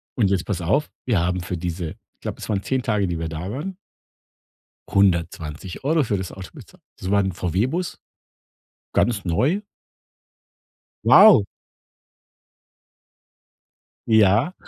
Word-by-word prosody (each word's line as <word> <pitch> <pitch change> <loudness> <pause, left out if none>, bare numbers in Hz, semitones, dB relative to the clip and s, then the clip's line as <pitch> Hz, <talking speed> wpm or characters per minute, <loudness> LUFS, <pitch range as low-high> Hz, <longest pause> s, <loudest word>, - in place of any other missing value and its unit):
Und 105 -6 +2
jetzt 95 -3 0
pass 95 -4 -3
auf, 135 - 0 0.2
wir 110 -6 +2
haben 90 +1 0
für 90 0 -4
diese 85 -1 -4 0.2
ich - - -62
glaube, - - -5
es - - -8
waren 100 -2 0
10 130 -1 -1
Tage, 105 -4 0
die 85 -1 -2
wir 80 -1 -3
da 80 +4 -5
waren 170 - -5 1.1
120 90 - 0
für 105 -4 -1
das 95 -2 -5
Auto 95 -1 -9
bezahlt. - - -15 0.2
Das 95 - -5
war 100 0 +3
’n 95 -1 0
VW 90 +6 -1
Bus, 175 +5 -4 0.9
ganz 110 -4 +1
neu. 130 - +1 1.4
Wow. 200 - +8 2.6
Ja, 110 - +4
100 Hz, 130 wpm, -22 LUFS, 90-120 Hz, 2.6 s, Wow